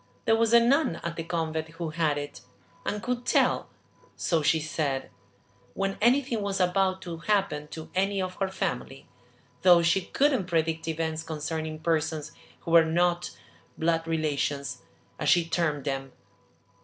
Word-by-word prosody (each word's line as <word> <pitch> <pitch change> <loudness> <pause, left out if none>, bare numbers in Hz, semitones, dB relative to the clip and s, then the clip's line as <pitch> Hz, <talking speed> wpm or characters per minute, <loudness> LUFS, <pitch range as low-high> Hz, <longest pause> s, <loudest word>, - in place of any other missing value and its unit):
There 225 - +4
was 225 0 +2
a 235 - +8
nun 250 - +3
at 170 0 -3
the 165 - -4
convent 160 -1 -2
who 165 0 -5
had 155 -2 +1
it, 145 0 -6 0.5
and 210 0 -2
could 245 0 -2
tell, - - +2 0.5
so 165 -3 +1
she 160 +2 +3
said, 150 -3 -2 0.6
when 195 0 -2
anything 245 -1 +3
was 200 -1 -2
about 185 +1 +1
to 170 -2 -6
happen 160 -4 0
to 155 +1 -9
any 195 +1 +1
of 185 -1 -2
her 195 - 0
family, 135 -7 -4 0.5
though 175 -2 +6
she 170 +3 +3
couldn't 270 -9 +1
predict 165 -1 0
events 160 0 -2
concerning 155 0 -4
persons 160 -2 -1 0.3
who 165 - -5
were 165 -1 +8
not 175 +2 0 0.4
`blood 165 0 +1
relations,' 145 -3 -1 0.4
as - - +1
she 175 -1 +5
termed 160 -4 0
them. 135 -1 -3
165 Hz, 155 wpm, -27 LUFS, 155-190 Hz, 0.6 s, a